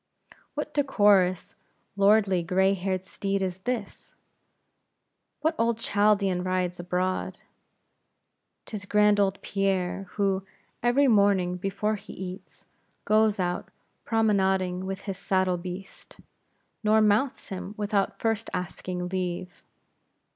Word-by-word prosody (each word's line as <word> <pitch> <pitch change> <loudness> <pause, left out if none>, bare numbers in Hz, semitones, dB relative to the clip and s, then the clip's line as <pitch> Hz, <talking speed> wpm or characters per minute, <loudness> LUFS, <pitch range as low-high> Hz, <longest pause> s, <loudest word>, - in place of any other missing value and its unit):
What 300 0 -4
decorous, 205 - +3 0.4
lordly, 200 -2 +4
gray 190 +3 +2
haired 190 -1 -2
steed 195 0 -2
is 185 -1 -3
this? 225 0 -5 1.3
What 315 +2 +2
old 230 0 +2
Chaldean 205 -4 +2
rides 185 -1 -1
abroad? 180 +1 -2 1.3
'Tis 205 -2 -6
grand 210 0 +4
old 195 -1 +1
Pierre; 195 -1 -1
who, 195 -2 0 0.4
every 245 +4 +3
morning 200 -5 +3
before 195 +3 -1
he 200 - -11
eats, 185 +1 -9 0.4
goes 215 -1 +3
out 180 -1 -2 0.3
promenading 190 -4 +1
with 195 +1 -4
his 195 -2 -5
saddle 185 -2 +1
beast; 180 +2 -9 0.7
nor 215 +1 +4
mounts 220 +6 +1
him, 195 +1 -6
without 205 -1 0
first 225 -1 -1
asking 180 0 -4
leave. 180 -1 -4
195 Hz, 110 wpm, -27 LUFS, 185-210 Hz, 1.3 s, lordly